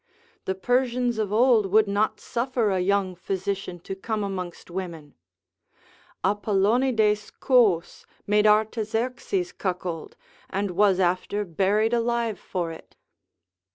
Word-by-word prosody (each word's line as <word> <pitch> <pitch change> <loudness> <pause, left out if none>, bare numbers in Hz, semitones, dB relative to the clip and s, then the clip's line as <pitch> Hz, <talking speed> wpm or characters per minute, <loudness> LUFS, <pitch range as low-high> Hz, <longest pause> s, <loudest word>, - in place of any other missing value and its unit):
The 190 - -1
Persians 245 +2 0
of 210 -2 -1
old 225 -2 +4
would 215 +2 +4
not 205 +2 0
suffer 240 -3 -1
a 190 - +1
young 190 0 +1
physician 190 0 -4
to 195 - -6
come 215 +2 -3
amongst 185 -3 -6
women. 170 -5 -6 1.1
Apollonides 210 +2 +2
Cous 215 -10 +2 0.2
made 210 +1 +3
Artaxerxes 225 - 0
cuckold, 180 -4 -4 0.3
and 200 0 -2
was 195 0 +3
after 185 +3 0
buried 200 +6 +1
alive 235 -2 0
for 175 -3 -3
it. 160 - -13
205 Hz, 115 wpm, -25 LUFS, 190-230 Hz, 1.1 s, old